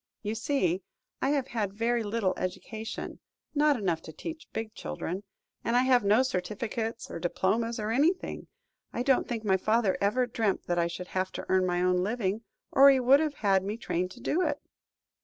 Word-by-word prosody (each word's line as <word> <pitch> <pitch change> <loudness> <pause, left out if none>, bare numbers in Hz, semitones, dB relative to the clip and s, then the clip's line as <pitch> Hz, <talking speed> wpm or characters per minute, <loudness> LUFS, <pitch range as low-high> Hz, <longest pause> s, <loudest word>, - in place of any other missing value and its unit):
You 210 +1 -1
see, 220 - 0 0.4
I 270 - +2
have 280 -3 0
had 205 -4 -2
very 235 +2 +1
little 205 -3 0
education 220 +4 -5 0.3
not 295 -1 +4
enough 180 -7 -1
to - - -9
teach 320 - -7
big 220 -1 -4
children 165 - -4 0.4
and 230 - 0
I 250 - +5
have 255 -3 +4
no 210 +5 +5
certificates 225 +1 -3
or - - -5
diplomas, 225 +7 0
or 215 +1 -2
anything. 310 +10 +1 0.4
I 245 - -2
don't 270 0 +3
think 230 -2 -3
my 190 -3 +3
father 215 0 +1
ever 225 +6 +2
dreamt 225 -4 -1
that 175 0 0
I 170 - +2
should 180 +1 -7
have 185 0 -1
to - - -5
earn 185 -1 +3
my 175 0 +1
own 180 0 +3
living, 205 +2 -1 0.3
or 275 +1 +8
he 270 -1 +5
would 260 +3 +6
have 305 -2 -1
had 195 -1 +4
me 205 +3 -3
trained 180 -5 -2
to - - -14
do 340 - 0
it." 295 -5 0
220 Hz, 195 wpm, -29 LUFS, 190-250 Hz, 0.4 s, or